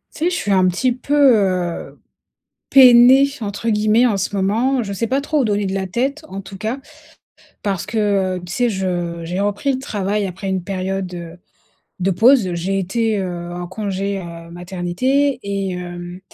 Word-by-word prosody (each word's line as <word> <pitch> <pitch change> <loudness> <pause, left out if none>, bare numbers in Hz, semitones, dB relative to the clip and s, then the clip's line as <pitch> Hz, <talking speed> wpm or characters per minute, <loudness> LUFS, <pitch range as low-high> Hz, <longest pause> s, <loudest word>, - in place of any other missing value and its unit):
Tu 320 - -2
sais, - - +3
je 360 - -2
suis 205 - -2
un 185 -1 +4
petit 195 +8 +1
peu, 260 +4 -2
heu, 195 -11 +2 0.7
«peinée» 255 +1 +8 0.2
entre 205 +2 -4
guillemets 215 +2 +3
en 220 -4 +1
ce 195 +1 -2
moment. 230 +7 +1
Je 200 -2 -4
sais 230 +4 -1
pas 265 +4 0
trop 295 +1 0
où - - +2
donner 205 -2 0
de 190 - -2
la 190 -1 -2
tête 270 - -2
en 195 -6 -7
tout 195 0 -10
cas. 220 +6 -3 0.8
Parce 195 -3 -2
que, 225 +2 -4 0.4
heu, - - -7
tu 180 - -8
sais, 245 +5 +1
je 175 -3 -3
j'ai 175 +3 -3
repris 205 +7 0
le 260 - -1
travail 205 -5 -2
après 190 +1 -5
une 190 -2 -1
période, 190 0 -3
heu, 170 -1 -8 0.6
de 190 +1 +1
pause. 220 0 +4
J'ai 185 +3 -1
été, 215 +3 0
heu, 175 -2 -5
en 175 0 -5
congé, 195 0 -3
heu, 170 -2 -9
maternité 190 +11 -1
et 195 -1 -2
hem 175 0 -7
195 Hz, 185 wpm, -19 LUFS, 180-235 Hz, 0.8 s, peinée